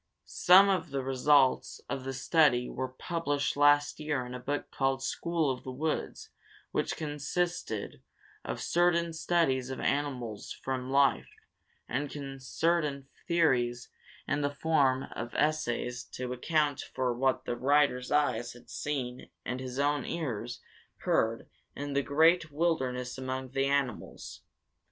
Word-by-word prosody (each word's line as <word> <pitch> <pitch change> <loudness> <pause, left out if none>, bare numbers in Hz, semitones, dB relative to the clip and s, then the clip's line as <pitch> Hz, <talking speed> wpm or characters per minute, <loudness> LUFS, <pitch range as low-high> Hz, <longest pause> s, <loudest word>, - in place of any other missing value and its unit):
Some 190 +2 +6
of 180 -5 0
the 135 -1 -2
results 135 +1 +3
of 135 -2 -4
this 135 -1 -4
study 140 -7 +4
were 130 - -3
published 145 +2 -2
last 145 0 +4
year 150 -4 -1
in 125 - -8
a 125 - -5
book 145 +3 -3
called 135 -1 0
"School 165 -1 0
of 125 - -6
the - - -7
Woods," 150 +5 -3 0.4
which - - -1
consisted 150 - -3 0.4
of - - -4
certain 170 -1 +2
studies 160 -6 +1
of 130 - -5
animals 130 -7 -2
from 130 -1 -4
life, 140 0 +3 0.6
and 135 +1 -4
certain 145 -1 0 0.2
theories 125 -8 +2 0.4
in 145 +1 0
the 145 - +1
form 145 -3 +2
of 120 0 -6
essays 125 -5 0
to 125 0 -4
account 150 +2 +1
for 130 -2 -2
what 130 +1 0
the 120 - -2
writer's 135 -1 +2
eyes 125 -5 +1
had 120 0 -15
seen 130 -4 -4 0.2
and 125 +1 -3
his 130 -1 -6
own 145 -1 +1
ears 125 -7 -4 0.4
heard - - +1 0.3
in 145 0 -4
the 140 - +2
great 160 +4 +3
wilderness 130 -6 -1
among 130 0 -4
the 135 0 +1
animals. 140 -5 -2
140 Hz, 135 wpm, -30 LUFS, 130-150 Hz, 0.6 s, Some